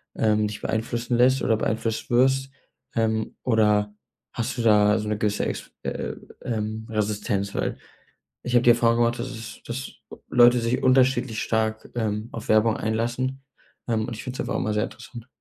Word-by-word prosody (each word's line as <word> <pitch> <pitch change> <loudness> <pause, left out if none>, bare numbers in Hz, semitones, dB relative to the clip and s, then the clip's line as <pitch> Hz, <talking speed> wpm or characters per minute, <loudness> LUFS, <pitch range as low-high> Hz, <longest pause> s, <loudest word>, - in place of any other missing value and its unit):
ähm, 105 -1 +2
dich 105 - -6
beeinflussen 115 +2 -1
lässt 130 +2 +4
oder 115 - +3
beeinflusst 110 0 -2
wirst, 135 +2 +3 0.4
ähm, 110 -1 0
oder 105 -3 +2 0.4
hast 120 +2 -3
du 120 - -1
da 105 -1 +5
so 105 - -4
'ne 105 - -1
gewisse 105 0 0
ex - - -5
äh, - - -3 0.3
ähm, 110 -1 -3
Resistenz? 105 -2 -1
Weil, - - -1 0.7
ich 125 - -4
habe 120 - +5
dir 120 -1 +7
vorgemacht, 120 0 +2
dass 120 - -3
es 115 -1 -9
dass 130 +3 -5 0.4
Leute 120 0 +6
sich 115 +2 -1
unterschiedlich 130 -3 +3
stark, 110 -1 -1
ähm, 110 -1 -2
auf 115 - -7
Werbung 110 +1 +4
einlassen, 120 +4 -2 0.4
ähm, 110 -2 0
und 115 - -5
ich - - -8
finde 125 0 -6
es - - -2
einfach - - -3
immer 110 - -1
sehr 105 - +1
interessant. 120 -1 -11
115 Hz, 170 wpm, -24 LUFS, 110-120 Hz, 0.7 s, dir